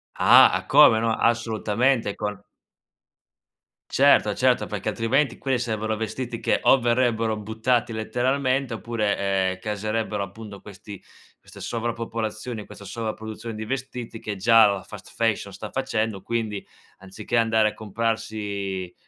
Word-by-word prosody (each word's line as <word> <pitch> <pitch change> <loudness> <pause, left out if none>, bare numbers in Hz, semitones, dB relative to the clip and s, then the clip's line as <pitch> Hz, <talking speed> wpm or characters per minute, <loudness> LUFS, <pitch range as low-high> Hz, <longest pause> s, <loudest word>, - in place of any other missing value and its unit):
Ah, - - +6
come 110 - +7
no? 115 0 +1
Assolutamente 115 0 +1
con 105 -1 -4 1.5
Certo, - - +4
certo, - - +2
perché - - -4
altrimenti 125 +3 0
quelli 135 -2 0
sarebbero 110 -2 -2
vestiti 115 +2 -5
che - - +1
o - - +6
verrebbero 115 -2 +1
buttati 110 +3 -1
letteralmente 130 +3 0
oppure, 110 -2 -1
ehm, 95 -1 0
che 105 +2 -3
sarebbero 110 0 -2
appunto 100 +1 -9
questi 100 0 -11 0.4
queste - - -14
sovrappopolazioni, 115 -1 -4
questa - - -12
sovraproduzione 110 +1 -6
di 110 - -5
vestiti 125 -1 -5
che 105 -2 -5
già 115 +3 +6
la 100 -2 0
fast 105 0 -12
fashion 110 -3 -1
sta 105 +3 -8
facendo. 110 -6 -2
Quindi, 110 -2 -3 0.3
anziché 95 +5 -4
andare 110 -1 +3
a - - -10
comprarsi 100 -4 -3
110 Hz, 130 wpm, -24 LUFS, 105-115 Hz, 1.5 s, come